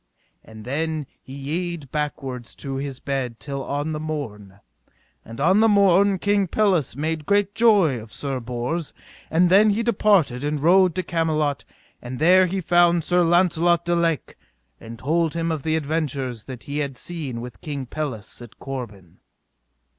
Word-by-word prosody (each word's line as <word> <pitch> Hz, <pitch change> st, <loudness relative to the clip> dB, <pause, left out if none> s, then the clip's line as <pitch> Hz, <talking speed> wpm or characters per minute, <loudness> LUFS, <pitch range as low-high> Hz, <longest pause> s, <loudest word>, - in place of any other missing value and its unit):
And 110 Hz, -1 st, -12 dB
then 155 Hz, +3 st, -2 dB, 0.2 s
he -, -, -14 dB
yede 155 Hz, +1 st, -4 dB
backward 135 Hz, -5 st, -3 dB
to 135 Hz, +3 st, -6 dB
his 135 Hz, -1 st, -5 dB
bed 130 Hz, -4 st, -3 dB
till 140 Hz, -2 st, -5 dB
on 145 Hz, +3 st, -3 dB
the 155 Hz, -, -3 dB
morn. 105 Hz, -11 st, -6 dB, 0.6 s
And 115 Hz, +2 st, -10 dB
on 185 Hz, +8 st, +4 dB
the 225 Hz, -, +5 dB
morn 200 Hz, -1 st, +4 dB
King 205 Hz, 0 st, +1 dB
Pelles 185 Hz, -, +1 dB
made 155 Hz, +1 st, -3 dB
great 205 Hz, 0 st, +2 dB
joy 200 Hz, -, +4 dB
of 110 Hz, 0 st, -12 dB
Sir 135 Hz, -2 st, -3 dB
Bors; 125 Hz, +7 st, -4 dB, 0.3 s
and 175 Hz, +3 st, +3 dB
then 205 Hz, +3 st, +6 dB
he 215 Hz, +3 st, +1 dB
departed 195 Hz, -, +2 dB
and 150 Hz, 0 st, -1 dB
rode 180 Hz, +3 st, +4 dB
to 185 Hz, -, -1 dB
Camelot, 155 Hz, -5 st, -1 dB, 0.4 s
and 125 Hz, +1 st, -6 dB
there 185 Hz, +5 st, +5 dB
he 190 Hz, +2 st, -2 dB
found 175 Hz, -1 st, +3 dB
Sir 180 Hz, +2 st, +2 dB
Launcelot 170 Hz, 0 st, +3 dB
du 175 Hz, -, +1 dB
Lake, 165 Hz, -3 st, -1 dB, 0.4 s
and 115 Hz, 0 st, -10 dB
told 165 Hz, +4 st, 0 dB
him 165 Hz, 0 st, -1 dB
of 155 Hz, -3 st, -2 dB
the 160 Hz, +2 st, 0 dB
adventures 140 Hz, -6 st, -2 dB
that 130 Hz, -3 st, -9 dB
he 145 Hz, +1 st, -4 dB
had 140 Hz, -3 st, -3 dB
seen 145 Hz, -9 st, -5 dB
with 120 Hz, -5 st, -9 dB
King 140 Hz, -3 st, -5 dB
Pelles 125 Hz, -6 st, -6 dB
at 120 Hz, -2 st, -12 dB
Corbin. 110 Hz, -10 st, -8 dB
155 Hz, 165 wpm, -23 LUFS, 130-175 Hz, 0.6 s, then